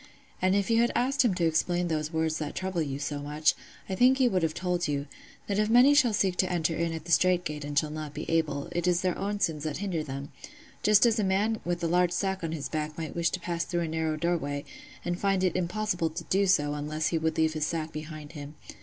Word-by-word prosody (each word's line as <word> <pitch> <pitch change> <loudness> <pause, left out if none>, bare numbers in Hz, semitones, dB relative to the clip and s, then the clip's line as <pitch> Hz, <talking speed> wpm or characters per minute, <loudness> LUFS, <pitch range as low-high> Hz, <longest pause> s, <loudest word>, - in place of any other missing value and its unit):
And 185 +1 +3
if 200 +2 +1
you 230 0 +4
had 240 - +2
asked 270 +2 +2
him 220 -7 +2
to 175 - +1
explain 175 +2 +1
those 155 -1 -2
words 160 -1 0
that 150 -1 -4
trouble 185 -2 -2
you 140 -3 -2
so 145 0 -3
much, 150 +2 +1 0.3
I 190 - -3
think 250 +7 +5
he 260 -2 +4
would 190 -6 +1
have 160 -1 0
told 180 -1 -1
you, 140 -1 -1 0.4
that 200 0 -1
if 215 0 +2
many 250 +5 +7
shall 270 -5 +5
seek 190 -3 +1
to 185 - +1
enter 165 -2 0
in 170 0 -1
at 160 -1 -6
the 170 - -5
strait 180 0 +3
gate 150 -2 -4
and 145 0 -4
shall 150 +1 +2
not 155 -1 -6
be - - -5
able, 155 -3 0
it 175 0 -1
is 175 -1 +3
their 185 -1 0
own 205 +1 -3
sins 160 -6 0
that 155 -2 -3
hinder 185 -5 -2
them; 140 -1 -6 0.5
just 210 +1 +5
as 230 -1 +3
a - - +2
man 205 +4 +1
with 175 0 -2
a - - +2
large 175 +1 +2
sack 190 0 -1
on 165 - -2
his 155 -3 -3
back 155 0 -4
might 160 -2 -5
wish 170 -1 +2
to 185 - -3
pass 170 -1 -2
through 175 -1 -2
a 165 - -1
narrow 160 -1 -1
doorway, 150 -4 -1 0.4
and 175 0 -2
find 195 -2 +1
it 185 -3 +1
impossible 180 -1 -1
to 155 - -6
do 195 +1 +1
so 145 -5 +3
unless 150 +1 -2
he 165 - 0
would 160 0 -1
leave 160 0 +2
his 155 -1 -1
sack 160 -1 -3
behind 155 -1 -8
him. 145 -1 -9
170 Hz, 260 wpm, -28 LUFS, 155-190 Hz, 0.5 s, many